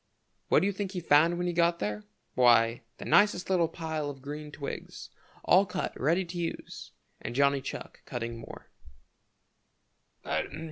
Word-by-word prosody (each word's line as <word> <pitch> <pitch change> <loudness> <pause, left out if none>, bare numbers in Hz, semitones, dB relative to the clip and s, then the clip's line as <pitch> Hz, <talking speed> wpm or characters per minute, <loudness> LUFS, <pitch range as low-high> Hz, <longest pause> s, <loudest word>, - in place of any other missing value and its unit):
What - - +5
do - - +1
you 200 - +2
think 195 0 -4
he 180 - -2
found 165 +1 +4
when 175 - -1
he 175 - -1
got 170 0 +3
there? 105 -3 -3 0.3
Why, 120 -2 +4 0.2
the - - -8
nicest 205 -3 +3
little 175 -3 +3
pile 160 -2 -4
of 135 -2 -9
green 150 +1 -6
twigs, 140 -1 -7 0.3
all 185 +2 +6
cut 185 - -3
ready 170 +7 +1
to 175 +1 -6
use, 170 -1 -5 0.3
and - - -5
Johnny 140 0 +3
Chuck 135 - -7
cutting 115 -1 -5
more. 115 - -11
155 Hz, 155 wpm, -29 LUFS, 135-175 Hz, 0.3 s, all